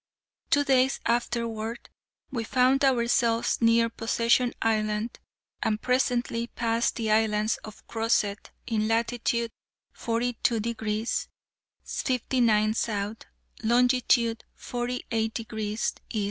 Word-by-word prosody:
Two 285 - +4
days 265 -1 +3
afterward 235 -1 -2 0.4
we 235 -3 -2
found 255 +3 +3
ourselves 235 -3 +2
near 230 0 +4
Possession 230 +1 +1
Island, 215 0 0 0.4
and 215 -1 0
presently 245 -1 0
passed 230 -1 0
the 225 -3 -1
islands 215 0 +2
of 215 -1 -12
Crozet, 225 -3 0 0.2
in 215 -2 0
latitude 235 0 0 0.4
42 235 0 0
degrees 220 0 -2 0.6
59' 240 -5 +1
S., 215 -1 -2 0.5
longitude 240 0 +3
48 240 -2 -3
degrees 220 -1 -2 0.2
E. 220 - -1
230 Hz, 95 wpm, -27 LUFS, 220-245 Hz, 0.6 s, Two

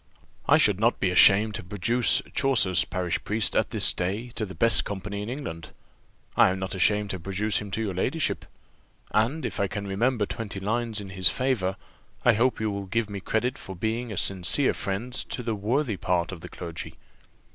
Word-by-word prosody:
I - - +6
should 105 -3 +3
not 115 +3 +2
be 95 - +1
ashamed 105 +4 +6
to - - -5
produce 105 +6 +2
Chaucer's 100 - +3
parish 90 -3 -2
priest 105 0 0
at - - +2
this - - +3
day 100 +7 -3
to 110 -2 -4
the 95 - -9
best 115 -2 +4
company 100 0 -5
in 105 - -5
England 85 - -6 0.7
I - - +6
am 95 - -1
not 95 0 -4
ashamed 105 +2 +1
to 95 - -4
produce 100 +4 -1
him 105 - -7
to 105 +4 -2
your 100 -3 -2
ladyship; 130 - -1 0.7
and 120 +9 +1
if - - -4
I 100 - +2
can 100 +1 -5
remember 110 +3 +1
twenty 105 -2 -5
lines 110 +2 -1
in 100 - -8
his 95 -4 +3
favour, 115 - 0 0.5
I 120 - +7
hope 120 +3 +1
you 110 -1 -1
will 100 -1 -5
give 110 +1 -1
me 100 - -4
credit 120 +7 -1
for 95 - -7
being 110 +5 -2
a 105 - -5
sincere 95 +11 +1
friend 105 +5 -3
to 125 0 -4
the 115 -1 -1
worthy 110 +2 -1
part 90 -1 0
of 90 -4 -8
the - - -8
clergy. 85 -2 -7
105 Hz, 200 wpm, -26 LUFS, 95-115 Hz, 0.7 s, I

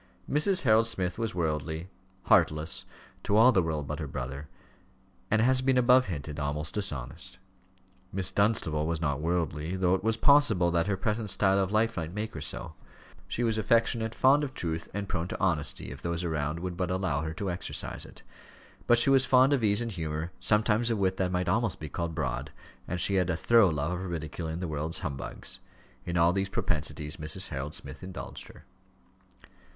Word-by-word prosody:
Mrs. 185 +6 +4
Harold 110 -2 +4
Smith 95 -4 -2
was 115 -5 -2
worldly, 80 0 -2 0.4
heartless 75 +2 +2 0.4
to 100 - +1
all 120 +4 +7
the 95 - +3
world 80 -3 -2
but 75 +1 -5
her 75 - -4
brother 65 +2 -6 0.8
and, 110 0 +3
as - - +3
has 130 0 +3
been 130 0 +2
above 125 0 +5
hinted, 75 -3 -5
almost 75 +2 -2
dishonest. 75 -13 -1 0.7
Miss 95 -2 +2
Dunstable 80 -8 +1
was 85 -1 -1
not 75 -3 -1
worldly, 85 0 -1
though 90 -1 +2
it 95 - 0
was 110 0 +1
possible 115 - +4
that 85 +1 +1
her 100 -2 0
present 105 +2 -2
style 95 0 +3
of 95 0 0
life 110 +1 +1
might 85 +2 -4
make 110 +1 -3
her 80 - -6
so; 80 - -6 0.5
she 105 +6 -2
was 110 -2 +1
affectionate, 115 0 +1
fond 140 +3 +4
of 135 -2 -5
truth, 80 -1 -4
and 100 +1 -4
prone 85 -1 -2
to - - -5
honesty, 80 -7 0
if - - -9
those 85 +1 -2
around 80 -1 -2
would 90 -1 -4
but 90 -1 -2
allow 90 -6 -1
her 80 +1 -4
to 100 0 -3
exercise 90 - -4
it. - - -12 0.6
But 120 - +5
she 135 +4 +4
was 135 -1 +5
fond 130 +2 +5
of 130 -5 +1
ease 105 +1 +4
and 115 -1 -3
humour, 80 -2 -4
sometimes 110 +2 +2
of 115 - 0
wit 95 -1 0
that 90 -1 0
might 90 0 -1
almost 110 +3 0
be 80 - -6
called 85 +3 -4
broad, 70 -7 -3 0.4
and 90 - -3
she 100 - +3
had 90 - -2
a 80 - 0
thorough 115 0 +5
love 75 +1 -1
of 90 +1 -4
ridiculing 80 0 -4
the 90 - -2
world's 80 +1 -3
humbugs. 70 -2 -6 0.5
In 85 0 -1
all 85 +1 +4
these 95 0 -1
propensities 75 -4 -2
Mrs. 80 +5 -1
Harold 75 0 -4
Smith - - -8
indulged 95 0 -8
her. - - -16
90 Hz, 195 wpm, -28 LUFS, 80-110 Hz, 0.8 s, all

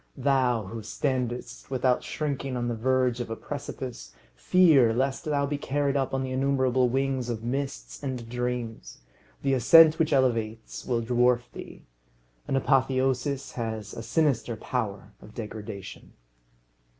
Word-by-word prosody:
Thou 130 -4 +2
who 110 +4 -7
standest 125 +3 -3
without 130 -1 +1
shrinking 140 -3 -3
on 120 0 -2
the 120 - -1
verge 125 +1 +1
of 120 - -4
a 115 - -3
precipice, - - -7 0.2
fear 135 - +5
lest 135 +5 -1
thou 145 -2 +1
be 145 0 -3
carried 145 0 0
up 135 -2 0
on 135 0 -1
the 130 - -4
innumerable 130 -1 +2
wings 135 -1 -1
of 115 -2 -3
mists 120 - -4
and 125 -3 -4
dreams. 120 - -4 0.5
The 135 - +2
ascent 155 +6 +7
which 160 -1 +2
elevates 115 -5 0
will 120 -2 0
dwarf 120 +1 +2
thee. - - -10 0.6
An - - 0
apotheosis 135 0 +1
has 110 -3 -5
a - - -6
sinister 120 -1 0
power 105 -4 -4
of 105 - -14
degradation. 105 -3 -8
125 Hz, 140 wpm, -27 LUFS, 115-135 Hz, 0.6 s, ascent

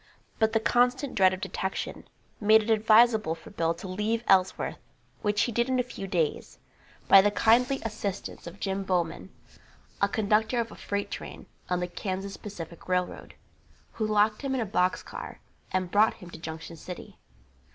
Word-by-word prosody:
But 220 0 +2
the 225 - +4
constant 250 +4 +2
dread 190 -2 +5
of 185 0 -5
detection 190 0 -4 0.3
made 215 +1 +5
it 225 - -1
advisable 220 -4 +4
for 165 - -14
Bill 165 0 0
to 190 - -8
leave 210 +5 -1
Ellsworth, 190 -1 +2 0.4
which 205 0 +1
he 240 - -1
did 235 +3 0
in 260 - +2
a - - +3
few 220 -5 -7
days, 170 -5 -1 0.5
by 195 - +9
the 205 - +3
kindly 245 +6 +3
assistance 205 -5 -5
of 175 +4 -10
Jim 195 -1 -2
Bomon, 180 -1 -1 0.7
a 200 - +3
conductor 220 +3 +1
of 230 -2 -2
a - - -10
freight 200 0 -3
train - - -7 0.2
on 180 0 0
the 180 - -1
Kansas 190 +2 -4
Pacific 170 -5 -9
railroad, 180 -1 -2 0.6
who 220 - -2
locked 210 0 +2
him 270 -2 -1
in 255 - 0
a - - 0
box 185 -2 +1
car - - -8 0.3
and 185 -1 -1
brought 210 +2 +4
him 180 -4 -12
to - - -10
Junction 160 +1 -7
City. 180 +3 -9
205 Hz, 175 wpm, -28 LUFS, 185-220 Hz, 0.7 s, by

